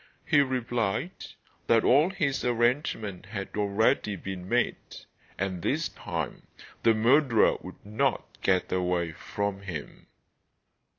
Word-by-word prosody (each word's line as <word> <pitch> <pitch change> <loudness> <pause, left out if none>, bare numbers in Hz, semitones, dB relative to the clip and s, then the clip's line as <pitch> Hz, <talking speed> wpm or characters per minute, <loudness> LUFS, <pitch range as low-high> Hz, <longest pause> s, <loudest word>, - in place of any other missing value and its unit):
He 145 - +4
replied 120 - -1 0.6
that 115 -1 +4
all 145 +7 +5
his 155 -8 -1
arrangements 120 - 0
had 100 -3 -5
already 105 0 +1
been 95 0 -7
made, 120 0 +2 0.6
and 95 -2 -2
this - - 0
time - - -5 0.3
the 115 - +4
murderer 120 +1 +4
would 95 - -11
not 105 +1 -1
get 95 -1 +1
away 90 -2 0
from 100 +4 -4
him. 85 -7 -7
105 Hz, 115 wpm, -28 LUFS, 95-125 Hz, 0.6 s, all